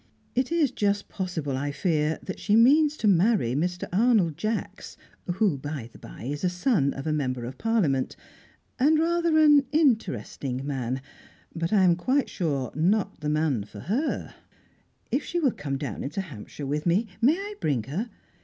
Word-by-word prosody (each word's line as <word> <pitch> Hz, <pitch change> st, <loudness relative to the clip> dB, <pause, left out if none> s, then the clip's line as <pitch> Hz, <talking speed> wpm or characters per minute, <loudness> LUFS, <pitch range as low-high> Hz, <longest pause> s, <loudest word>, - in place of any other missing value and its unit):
It 255 Hz, +4 st, 0 dB
is 320 Hz, -6 st, +2 dB
just 205 Hz, -3 st, -1 dB
possible, 165 Hz, -8 st, -3 dB
I 145 Hz, +2 st, -2 dB
fear, 155 Hz, -1 st, 0 dB
that 190 Hz, -, -6 dB
she 210 Hz, -, +2 dB
means 295 Hz, +6 st, +5 dB
to 215 Hz, -, 0 dB
marry 195 Hz, -, +3 dB
Mr. 175 Hz, +5 st, -1 dB
Arnold 205 Hz, -6 st, +3 dB
Jacks, 215 Hz, +5 st, -4 dB, 0.4 s
who, 190 Hz, -8 st, +1 dB
by 140 Hz, -5 st, -6 dB
the -, -, -14 dB
bye, -, -, -11 dB
is 145 Hz, +6 st, -4 dB
a 180 Hz, -, +3 dB
son 180 Hz, -, +1 dB
of 135 Hz, -, -6 dB
a 155 Hz, -, 0 dB
Member 130 Hz, -5 st, -2 dB
of 130 Hz, +2 st, -8 dB
Parliament, 170 Hz, -, +1 dB, 0.6 s
and 300 Hz, +4 st, +4 dB
rather 335 Hz, 0 st, +2 dB
an 295 Hz, -3 st, +6 dB
interesting 140 Hz, -, 0 dB
man, 130 Hz, -2 st, -3 dB, 0.5 s
but, 165 Hz, 0 st, -2 dB
I 205 Hz, -3 st, +4 dB
am 175 Hz, -2 st, +5 dB
quite 260 Hz, +10 st, 0 dB
sure, 140 Hz, -7 st, -2 dB
not 195 Hz, +6 st, +1 dB
the 150 Hz, -1 st, -2 dB
man 150 Hz, -7 st, +1 dB
for 100 Hz, 0 st, -11 dB
her. 250 Hz, -, -2 dB, 0.8 s
If 275 Hz, +4 st, +1 dB
she 350 Hz, -, -2 dB
will 280 Hz, -6 st, +3 dB
come 140 Hz, -7 st, -4 dB
down 135 Hz, -7 st, -5 dB
into 150 Hz, +8 st, -3 dB
Hampshire 145 Hz, -, -8 dB
with 150 Hz, +4 st, -2 dB
me 185 Hz, +7 st, +3 dB, 0.2 s
may 260 Hz, +6 st, +5 dB
I 405 Hz, +2 st, -5 dB
bring 135 Hz, -7 st, 0 dB
her? 180 Hz, -, -4 dB
180 Hz, 175 wpm, -26 LUFS, 140-235 Hz, 0.8 s, an